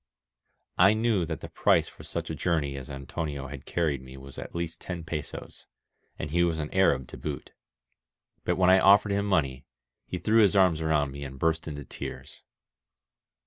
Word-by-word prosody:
I 95 +4 +7
knew 110 -6 +1
that 80 - -4
the - - -6
price - - +3
for - - -13
such - - -5
a - - -3
journey 75 -6 0
as 65 0 -7
Antonio 70 0 -5
had 70 -1 -9
carried 75 -6 0
me 65 +1 -11
was 70 0 -10
at - - -8
least 85 -1 -4
ten 90 -2 -5
pesos, 80 -2 -7 0.5
and 75 - -5
he 85 +2 +3
was 85 -2 +1
an 75 +2 -4
Arab 70 -10 +3
to - - -9
boot. - - -5 0.9
But - - +1
when 95 0 +5
I 95 - +7
offered 100 +2 +6
him 100 +1 0
money, 70 -9 0 0.4
he 90 - -3
threw 110 +5 +4
his 100 -2 +4
arms 90 -5 +4
around 75 -3 +1
me 70 +1 -7
and 65 -1 -7
burst 80 +3 0
into 70 -2 -6
tears. - - -8
80 Hz, 185 wpm, -28 LUFS, 70-95 Hz, 0.9 s, I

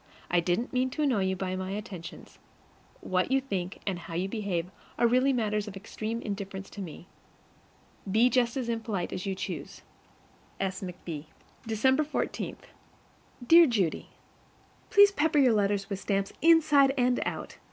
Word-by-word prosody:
I 175 - +4
didn't 180 +10 -1
mean 255 0 +1
to 300 +4 -2
annoy 235 -9 +2
you 190 0 0
by 185 0 -3
my 185 0 -4
attentions. 195 -6 -8 0.6
What 185 +3 0
you 270 - +4
think 195 -9 -4
and 190 -3 -2
how 165 -1 -8
you 180 +3 0
behave 190 -4 -3 0.3
are 240 - +3
really 255 +3 +4
matters 210 -4 -1
of 200 - -7
extreme 220 +3 -5
indifference 195 -2 -5
to 205 - -7
me. 175 -2 -8 1.1
Be 225 +4 +5
just 250 -1 +1
as 255 -3 -2
impolite 225 -5 -2
as 185 +2 -4
you 195 - -1
choose. 195 - -6 0.8
S. 190 -1 -2
McB. 175 -5 -6 0.4
December 260 +7 +2
14. 300 - -3 0.9
Dear 335 +5 +8
Judy: 200 - -1 0.8
PLEASE 405 -1 +7
pepper 320 -4 +1
your 260 -5 +5
letters 200 -1 +1
with 195 -2 -4
stamps, 195 -1 -1
inside 295 -4 +5
and 250 -1 +2
out. - - -5
210 Hz, 155 wpm, -28 LUFS, 190-255 Hz, 1.1 s, Dear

